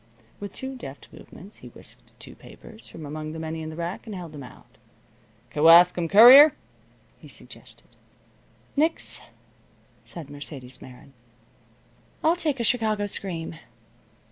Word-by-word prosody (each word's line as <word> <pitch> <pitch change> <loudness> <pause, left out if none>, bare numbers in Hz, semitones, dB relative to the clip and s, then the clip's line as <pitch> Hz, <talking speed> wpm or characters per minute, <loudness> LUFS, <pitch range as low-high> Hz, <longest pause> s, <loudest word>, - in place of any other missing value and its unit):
With 205 -1 -7
two 265 0 -6
deft 140 - -11
movements 195 +5 -14
he - - -13
whisked - - -12
two - - -10
papers 220 0 -14
from 155 - -10
among 155 +1 -6
the 160 - -7
many 160 0 -5
in 155 - -6
the 160 - -8
rack, 170 +6 -6
and 210 - -6
held 175 -4 -8
them 145 -2 -10
out. 125 - -15 0.7
"Kewaskum 170 +2 +6
Courier?" 260 - +9 0.7
he - - -14
suggested. - - -12 0.9
"Nix," 315 +3 0 0.8
said 155 -5 -9
Mercedes 135 -3 -7
Meron, 130 +1 -14 1.1
"I'll 325 +2 +3
take 300 -6 -2
a - - -1
Chicago 220 -3 +1
Scream." 170 -5 -5
170 Hz, 135 wpm, -25 LUFS, 155-225 Hz, 1.1 s, Courier